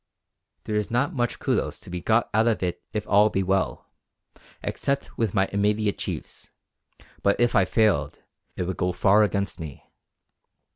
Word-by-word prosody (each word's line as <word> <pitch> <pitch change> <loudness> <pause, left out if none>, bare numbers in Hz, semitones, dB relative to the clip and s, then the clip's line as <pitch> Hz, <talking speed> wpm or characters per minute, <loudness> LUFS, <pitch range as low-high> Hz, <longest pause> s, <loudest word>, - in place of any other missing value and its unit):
There 105 -1 -2
is 105 - -1
not 130 +9 0
much 120 -5 -1
κυδος - - -1
to - - -10
be 90 -1 -4
got 110 +5 +2
out 110 +2 +3
of 110 -4 +1
it 90 -1 -2
if 105 -1 -3
all 105 +1 +5
be 95 -2 0
well 95 0 -1 0.8
except 140 0 -2
with 110 -4 -1
my 95 -1 +3
immediate 105 +1 +1
chiefs; - - -6 0.7
but 100 - +2
if 120 0 +3
I 95 - +4
failed 95 -9 +1 0.4
it - - -2
would 90 +1 -3
go 90 0 0
far 100 +4 +4
against 100 -3 0
me. 75 -4 -9
105 Hz, 165 wpm, -25 LUFS, 95-110 Hz, 0.8 s, all